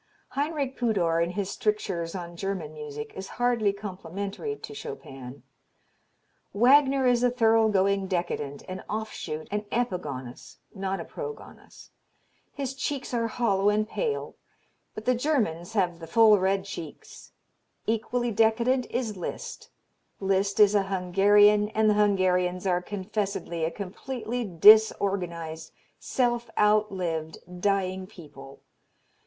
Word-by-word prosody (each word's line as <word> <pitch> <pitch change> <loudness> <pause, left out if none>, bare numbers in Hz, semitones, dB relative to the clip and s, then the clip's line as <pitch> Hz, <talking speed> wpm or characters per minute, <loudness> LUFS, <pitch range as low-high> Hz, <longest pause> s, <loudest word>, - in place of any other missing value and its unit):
Heinrich 285 -2 -2
Pudor 180 -9 +1
in 170 - -2
his 195 +1 -3
strictures 195 -5 -2
on 175 -2 -6
German 180 -4 -4
music 150 -1 -7
is 190 0 -6
hardly 240 -4 +2
complimentary 200 - -5
to 430 - -9
Chopin: 135 - -9 1.1
"Wagner 265 +4 +5
is 245 -1 +3
a 250 - +4
thorough 225 -2 +3
going 195 -1 +2
decadent, 170 -6 -3
an 185 0 -6
off 220 +1 -3
shoot, 155 -1 -5
an 210 0 -1
epigonus, 150 - -4 0.2
not 195 -1 -3
a - - -6
progonus. 460 -2 -9 0.6
His 270 -2 -4
cheeks 270 -1 -4
are 230 -1 +1
hollow 205 -4 +1
and 215 +1 +1
pale 440 - -3 0.6
but 215 - -7
the 255 - +4
Germans 225 - -1
have 180 -5 0
the 165 - -9
full 220 -1 +6
red 190 +1 +1
cheeks. 165 -6 -9 0.5
Equally 235 +2 -1
decadent 235 +4 +2
is 235 -4 -2
Liszt. 180 - -6 0.5
Liszt 195 +1 0
is 210 -1 +7
a 205 - +4
Hungarian 205 +3 +4
and 220 0 +3
the 210 - +5
Hungarians 185 -3 +2
are 180 -1 +1
confessedly 195 -3 -3
a - - 0
completely 230 +6 -5
disorganized, 180 -4 +4 0.3
self 240 -2 0
outlived, 190 -7 +1 0.2
dying 190 -1 0
people. 145 -8 -13
200 Hz, 125 wpm, -27 LUFS, 180-230 Hz, 1.1 s, is